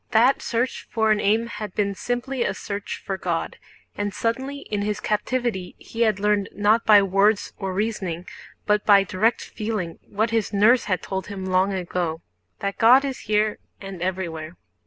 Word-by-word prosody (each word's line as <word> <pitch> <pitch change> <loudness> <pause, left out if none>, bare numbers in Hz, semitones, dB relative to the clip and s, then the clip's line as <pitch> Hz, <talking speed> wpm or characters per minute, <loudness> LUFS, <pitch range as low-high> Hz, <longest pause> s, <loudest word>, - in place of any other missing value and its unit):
That 240 +5 +4
search 240 +2 -2
for 220 -2 +2
an 210 - +3
aim 215 +3 +2
had 210 -4 -7
been 200 -1 0
simply 245 +5 -3
a 195 - -1
search 200 +1 -5
for 195 -1 -3
God, 170 -2 -2 0.4
and 205 0 -2
suddenly 265 +7 -2
in 210 -5 -3
his 210 0 -1
captivity 215 -3 -2
he 230 - -7
had 215 -4 +3
learned 205 -1 +1
not 210 +3 +2
by 205 -2 +8
words 195 +2 +2
or 195 -2 -3
reasoning 185 -4 -2 0.4
but 210 0 +2
by 200 -2 +6
direct 215 +5 +1
feeling 210 -6 -4
what 220 +2 -1
his 225 -3 0
nurse 215 +5 +4
had 185 -3 -1
told 190 -2 -4
him 195 -2 -6
long 185 +1 +2
ago: 175 -3 -3 0.4
that 200 0 -3
God 250 +5 +7
is 270 -2 -4
here 210 0 +2 0.2
and 195 -3 -8
everywhere. 175 -3 -3
210 Hz, 175 wpm, -24 LUFS, 190-225 Hz, 0.4 s, by